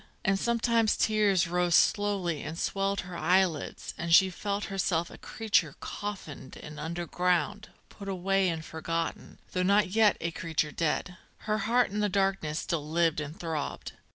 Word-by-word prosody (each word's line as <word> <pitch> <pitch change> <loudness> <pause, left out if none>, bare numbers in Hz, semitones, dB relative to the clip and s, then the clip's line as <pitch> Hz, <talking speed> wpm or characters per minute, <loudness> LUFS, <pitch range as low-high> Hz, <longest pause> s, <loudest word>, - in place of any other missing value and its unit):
And 195 0 +2
sometimes 230 -1 +2
tears 210 -5 +3
rose 175 0 +2
slowly 195 -7 +2
and 155 +2 -6
swelled 195 +2 -1
her 180 -1 -9
eyelids 180 -3 0
and 170 -1 -3
she 190 +2 +7
felt 200 +2 -3
herself 175 -3 -1
a - - -11
creature 185 -9 0
coffined 195 -10 -7
and 150 0 -9
underground, 175 +3 -1 0.2
put 200 -1 -9
away 195 0 +1
and 160 -1 -4
forgotten, 165 +1 -4
though 180 - -1
not 200 +1 +3
yet 215 +1 +4
a 170 +1 -2
creature 160 -3 -2
dead. 170 +3 -1 0.3
Her 215 0 0
heart 245 -3 +3
in 210 - -2
the 210 0 +1
darkness 195 -6 0
still 155 -3 -3
lived 165 -1 +2
and 150 +2 -7
throbbed. 160 -4 -4
180 Hz, 155 wpm, -29 LUFS, 165-200 Hz, 0.3 s, she